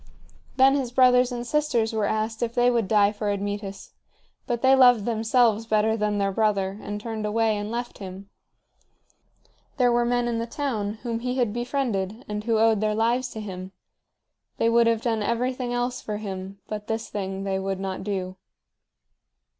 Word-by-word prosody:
Then 270 Hz, +1 st, +6 dB
his 265 Hz, -4 st, -1 dB
brothers 250 Hz, 0 st, +5 dB
and 240 Hz, -1 st, -4 dB
sisters 245 Hz, -6 st, 0 dB
were 215 Hz, -2 st, 0 dB
asked 220 Hz, +1 st, -2 dB
if 235 Hz, -1 st, -2 dB
they 245 Hz, 0 st, +4 dB
would 230 Hz, -4 st, +1 dB
die 205 Hz, -1 st, +4 dB
for 210 Hz, 0 st, -3 dB
Admetus, 200 Hz, 0 st, -4 dB, 0.6 s
but 240 Hz, -1 st, -2 dB
they 265 Hz, +1 st, +6 dB
loved 245 Hz, -5 st, +6 dB
themselves 225 Hz, -1 st, +2 dB
better 220 Hz, 0 st, +2 dB
than 210 Hz, -1 st, 0 dB
their 200 Hz, -1 st, +1 dB
brother, 200 Hz, -1 st, 0 dB
and 205 Hz, 0 st, -5 dB
turned 220 Hz, 0 st, -5 dB
away 220 Hz, +1 st, +1 dB
and 205 Hz, 0 st, -4 dB
left 240 Hz, +1 st, -5 dB
him. 190 Hz, 0 st, -8 dB, 1.5 s
There 250 Hz, -2 st, +4 dB
were 240 Hz, 0 st, +3 dB
men 245 Hz, 0 st, +1 dB
in 230 Hz, -1 st, -1 dB
the 230 Hz, -, -3 dB
town 225 Hz, -6 st, -2 dB
whom 230 Hz, -2 st, -2 dB
he 250 Hz, +1 st, -2 dB
had 240 Hz, -5 st, 0 dB
befriended 240 Hz, -3 st, -2 dB
and 210 Hz, 0 st, -4 dB
who 230 Hz, -2 st, +2 dB
owed 220 Hz, -1 st, +3 dB
their 215 Hz, 0 st, +1 dB
lives 240 Hz, +3 st, +1 dB
to 220 Hz, -, -6 dB
him; 190 Hz, -2 st, -7 dB, 0.8 s
they 230 Hz, -, +2 dB
would 235 Hz, 0 st, +4 dB
have 230 Hz, -1 st, +1 dB
done 225 Hz, -3 st, 0 dB
everything 245 Hz, +3 st, -1 dB
else 245 Hz, +1 st, -2 dB
for 210 Hz, -1 st, -4 dB
him, 195 Hz, -2 st, -6 dB
but 210 Hz, 0 st, -6 dB
this 225 Hz, 0 st, -2 dB
thing 195 Hz, -1 st, -4 dB
they 195 Hz, -1 st, -1 dB
would 190 Hz, 0 st, -3 dB
not 190 Hz, -1 st, -4 dB
do. 190 Hz, -2 st, -3 dB
225 Hz, 180 wpm, -25 LUFS, 205-240 Hz, 1.5 s, Then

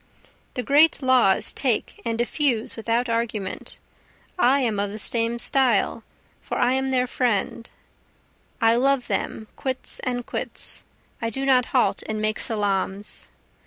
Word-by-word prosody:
The 250 Hz, -, -2 dB
great 295 Hz, +2 st, +4 dB
laws 250 Hz, -7 st, +3 dB
take 250 Hz, -6 st, 0 dB
and 230 Hz, -1 st, -2 dB
effuse 240 Hz, -2 st, 0 dB
without 230 Hz, +2 st, 0 dB
argument, 230 Hz, -4 st, -3 dB, 0.6 s
I 275 Hz, 0 st, +4 dB
am 225 Hz, -5 st, 0 dB
of 200 Hz, 0 st, 0 dB
the 210 Hz, -, -7 dB
same 230 Hz, +1 st, +1 dB
style, 235 Hz, -3 st, +2 dB, 0.4 s
for -, -, -4 dB
I 245 Hz, -, +3 dB
am 265 Hz, 0 st, 0 dB
their 255 Hz, -1 st, +2 dB
friend, 235 Hz, -2 st, -1 dB, 0.9 s
I 230 Hz, 0 st, +4 dB
love 270 Hz, 0 st, +2 dB
them 220 Hz, -, -3 dB
quits 260 Hz, -1 st, -2 dB
and 245 Hz, -1 st, -3 dB
quits, -, -, -5 dB, 0.4 s
I 230 Hz, -, -1 dB
do 270 Hz, +4 st, -3 dB
not 255 Hz, -2 st, +4 dB
halt 255 Hz, -, +1 dB
and 215 Hz, 0 st, -2 dB
make 215 Hz, 0 st, -1 dB
salaams. 205 Hz, -3 st, -1 dB
235 Hz, 140 wpm, -24 LUFS, 220-260 Hz, 0.9 s, great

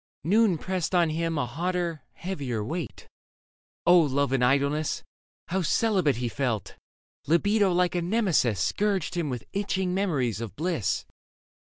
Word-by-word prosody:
Noon 200 Hz, +2 st, +3 dB
pressed 185 Hz, +1 st, -2 dB
on 170 Hz, -3 st, +3 dB
him 165 Hz, 0 st, -1 dB
a 145 Hz, -, 0 dB
hotter, 170 Hz, +3 st, -2 dB
heavier 140 Hz, -, -4 dB
weight. 155 Hz, -, -5 dB, 0.8 s
O 175 Hz, 0 st, +7 dB
Love 140 Hz, -3 st, +1 dB
in 135 Hz, -, +2 dB
Idleness! 140 Hz, +4 st, +1 dB, 0.5 s
how 190 Hz, +2 st, 0 dB
celibate 185 Hz, -4 st, +2 dB
He 120 Hz, +1 st, -2 dB
felt! 120 Hz, -, -2 dB, 0.5 s
Libido 200 Hz, +5 st, +3 dB
like 180 Hz, 0 st, +2 dB
a 175 Hz, -, 0 dB
nemesis 170 Hz, -, +1 dB
Scourged 195 Hz, -, 0 dB
him 170 Hz, -4 st, -1 dB
with 125 Hz, -3 st, -5 dB
itching 190 Hz, -2 st, -1 dB
memories 140 Hz, -, 0 dB
of 115 Hz, -4 st, -6 dB
bliss. 160 Hz, -, -1 dB
165 Hz, 135 wpm, -27 LUFS, 135-185 Hz, 0.8 s, O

